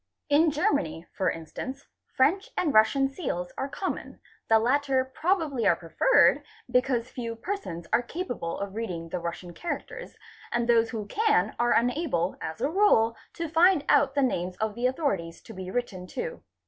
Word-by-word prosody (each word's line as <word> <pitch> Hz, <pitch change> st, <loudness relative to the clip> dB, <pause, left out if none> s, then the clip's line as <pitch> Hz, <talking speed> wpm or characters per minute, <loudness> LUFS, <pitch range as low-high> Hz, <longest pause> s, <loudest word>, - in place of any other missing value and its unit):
In 305 Hz, +3 st, +5 dB
Germany, 175 Hz, -, 0 dB
for 190 Hz, -, +1 dB
instance, 260 Hz, -, -6 dB, 0.3 s
French 340 Hz, +11 st, +3 dB
and 310 Hz, -5 st, +1 dB
Russian 220 Hz, +6 st, +5 dB
seals 250 Hz, -, -4 dB
are 270 Hz, -, -3 dB
common, 375 Hz, +6 st, -5 dB, 0.3 s
the 225 Hz, -, +7 dB
latter 260 Hz, +3 st, +2 dB
probably 310 Hz, -, 0 dB
are -, -, +5 dB
_ -, -, -17 dB
preferred -, -, +4 dB, 0.3 s
because 250 Hz, -1 st, +1 dB
few 230 Hz, -2 st, -5 dB
persons 225 Hz, -, -5 dB
are -, -, +5 dB
capable 245 Hz, -, -4 dB
of 200 Hz, -1 st, -5 dB
reading 180 Hz, -7 st, -4 dB
the 180 Hz, -, -3 dB
Russian 175 Hz, +1 st, -6 dB
charac 345 Hz, -, -4 dB
ters -, -, -10 dB, 0.3 s
and 240 Hz, 0 st, 0 dB
those 230 Hz, -1 st, +4 dB
who 220 Hz, -3 st, -4 dB
can 435 Hz, -, +1 dB
are 240 Hz, 0 st, +3 dB
unable 240 Hz, -, +1 dB
as 160 Hz, 0 st, -5 dB
a -, -, +2 dB
rule 275 Hz, -, +4 dB, 0.2 s
to 335 Hz, -1 st, -3 dB
find 325 Hz, 0 st, +4 dB
out 270 Hz, -, +4 dB
the 280 Hz, -, +3 dB
names 180 Hz, -7 st, -1 dB
of 220 Hz, 0 st, -1 dB
_ -, -, -14 dB
the 240 Hz, +3 st, 0 dB
authorities 200 Hz, -, -2 dB
to 225 Hz, -, -11 dB
be 185 Hz, -2 st, -7 dB
written 190 Hz, -5 st, -3 dB
to. 485 Hz, -, -5 dB
245 Hz, 175 wpm, -27 LUFS, 195-300 Hz, 0.3 s, the